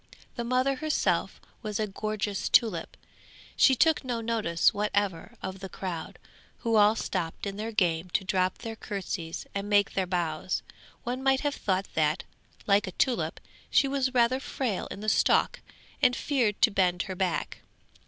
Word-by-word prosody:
The 240 Hz, -, -3 dB
mother 255 Hz, +3 st, +1 dB
herself 310 Hz, +1 st, 0 dB, 0.2 s
was 215 Hz, -3 st, -3 dB
a 215 Hz, -, +1 dB
gorgeous 210 Hz, 0 st, -3 dB
tulip; 215 Hz, -9 st, +2 dB, 0.6 s
she 265 Hz, -, +6 dB
took 320 Hz, +5 st, +3 dB
no 245 Hz, -3 st, -2 dB
notice 220 Hz, -7 st, +2 dB
whatever 205 Hz, 0 st, -1 dB
of 190 Hz, 0 st, -5 dB
the 190 Hz, 0 st, -7 dB
crowd, 175 Hz, -5 st, -5 dB, 0.4 s
who 230 Hz, -1 st, +1 dB
all 210 Hz, +1 st, +6 dB
stopped 175 Hz, -5 st, -3 dB
in 200 Hz, -1 st, -4 dB
their 220 Hz, +2 st, -4 dB
game 180 Hz, -5 st, +1 dB
to -, -, +2 dB
drop 185 Hz, -2 st, 0 dB
their 225 Hz, -1 st, -6 dB
curtsies 185 Hz, -6 st, -5 dB
and 200 Hz, +1 st, -3 dB
make 205 Hz, -1 st, +3 dB
their 190 Hz, -1 st, 0 dB
bows; 175 Hz, -1 st, -1 dB, 0.4 s
one 250 Hz, +2 st, -3 dB
might 270 Hz, 0 st, +3 dB
have 290 Hz, -1 st, 0 dB
thought 190 Hz, -5 st, -1 dB
that, 155 Hz, +2 st, +1 dB, 0.4 s
like 200 Hz, -1 st, +3 dB
a 185 Hz, -, -6 dB
tulip, 255 Hz, +4 st, 0 dB, 0.3 s
she 275 Hz, -, +4 dB
was 270 Hz, -1 st, 0 dB
rather 250 Hz, +1 st, +3 dB
frail 255 Hz, -6 st, -3 dB
in 200 Hz, -, -8 dB
the 215 Hz, -, -5 dB
stalk 215 Hz, -, +3 dB, 0.4 s
and 250 Hz, -, +5 dB
feared 240 Hz, -8 st, 0 dB
to 225 Hz, -, +6 dB
bend 180 Hz, -2 st, +2 dB
her 190 Hz, -, -5 dB
back. 185 Hz, -2 st, -2 dB
205 Hz, 165 wpm, -28 LUFS, 185-240 Hz, 0.6 s, she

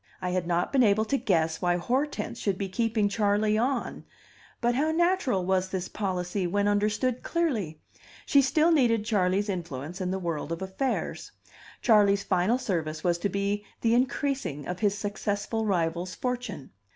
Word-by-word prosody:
I 180 Hz, -, -2 dB
had 180 Hz, -1 st, -1 dB
not 175 Hz, 0 st, 0 dB
been 270 Hz, -, +4 dB
able 215 Hz, -1 st, +4 dB
to 275 Hz, -, 0 dB
guess 165 Hz, -9 st, +1 dB
why 175 Hz, 0 st, +2 dB
Hortense 250 Hz, +4 st, -2 dB
should 195 Hz, -3 st, -1 dB
be 195 Hz, -, -2 dB
keeping 220 Hz, +1 st, +1 dB
Charley 210 Hz, 0 st, +1 dB
"on"; 245 Hz, +3 st, -1 dB, 0.6 s
but 240 Hz, 0 st, +1 dB
how 290 Hz, +5 st, +1 dB
natural 320 Hz, -, +1 dB
was 190 Hz, 0 st, +1 dB
this 185 Hz, -1 st, -3 dB
policy, 185 Hz, -1 st, -2 dB
when 205 Hz, +3 st, +1 dB
understood 210 Hz, +5 st, +1 dB
clearly! 225 Hz, -, -1 dB, 0.5 s
She 280 Hz, -, +5 dB
still 310 Hz, +5 st, +3 dB
needed 235 Hz, -8 st, +3 dB
Charley's 200 Hz, -2 st, +1 dB
influence 170 Hz, -2 st, -5 dB
in 180 Hz, -, -1 dB
the 190 Hz, -, -1 dB
world 165 Hz, -4 st, -3 dB
of 165 Hz, +3 st, -3 dB
affairs. 190 Hz, +8 st, -3 dB, 0.5 s
Charley's 200 Hz, -3 st, +4 dB
final 190 Hz, +6 st, +2 dB
service 160 Hz, -9 st, -3 dB
was 175 Hz, -1 st, +1 dB
to 200 Hz, -, 0 dB
be 200 Hz, +2 st, -1 dB, 0.2 s
the 230 Hz, 0 st, +3 dB
increasing 255 Hz, -, 0 dB
of 180 Hz, 0 st, -4 dB
his 205 Hz, -1 st, +1 dB
successful 205 Hz, +2 st, -2 dB
rival's 175 Hz, -1 st, -1 dB
fortune. 250 Hz, -, -4 dB
205 Hz, 165 wpm, -27 LUFS, 180-235 Hz, 0.6 s, She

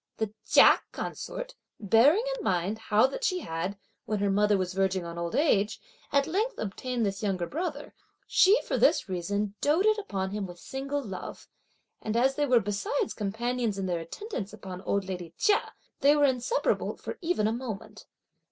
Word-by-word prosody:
The 220 Hz, -2 st, -2 dB
Chia -, -, +7 dB
consort, -, -, -5 dB, 0.3 s
bearing 235 Hz, -, +5 dB
in 475 Hz, -, -7 dB
mind 190 Hz, +4 st, 0 dB
how 215 Hz, +2 st, +3 dB
that 275 Hz, -, -3 dB
she 370 Hz, -5 st, +1 dB
had, 165 Hz, -, -4 dB, 0.3 s
when 215 Hz, -, -1 dB
her 200 Hz, 0 st, +1 dB
mother 205 Hz, +1 st, +3 dB
was 185 Hz, -1 st, -2 dB
verging 190 Hz, -1 st, 0 dB
on 170 Hz, 0 st, -6 dB
old 170 Hz, 0 st, -3 dB
age, 220 Hz, -8 st, +2 dB, 0.3 s
at 280 Hz, -1 st, +3 dB
length 415 Hz, +10 st, -1 dB
obtained 235 Hz, +3 st, -2 dB
this 195 Hz, 0 st, -2 dB
younger 190 Hz, -4 st, -1 dB
brother, 300 Hz, -, -4 dB, 0.3 s
she 400 Hz, +5 st, +5 dB
for -, -, -1 dB
this -, -, +4 dB
reason 200 Hz, +3 st, -2 dB
doated 390 Hz, +9 st, +3 dB
upon 190 Hz, -, -3 dB
him 205 Hz, -1 st, -3 dB
with 175 Hz, -1 st, -10 dB
single 275 Hz, +7 st, -4 dB
love; 190 Hz, -5 st, -7 dB, 0.5 s
and 220 Hz, +1 st, -2 dB
as 260 Hz, +3 st, +3 dB
they 290 Hz, +1 st, 0 dB
were 250 Hz, -2 st, +5 dB
besides 205 Hz, +4 st, -2 dB
companions 225 Hz, +1 st, -2 dB
in 195 Hz, -, -2 dB
their 175 Hz, -2 st, -1 dB
attendance 210 Hz, -, -6 dB
upon 190 Hz, -3 st, -8 dB
old 200 Hz, 0 st, -1 dB
lady 175 Hz, -3 st, -6 dB
Chia, 415 Hz, -1 st, +2 dB, 0.3 s
they 290 Hz, 0 st, +5 dB
were 290 Hz, -1 st, +4 dB
inseparable 265 Hz, -, 0 dB
for -, -, -7 dB
even 335 Hz, -11 st, 0 dB
a 220 Hz, -, 0 dB
moment. 230 Hz, -4 st, -7 dB
215 Hz, 175 wpm, -28 LUFS, 195-285 Hz, 0.5 s, Chia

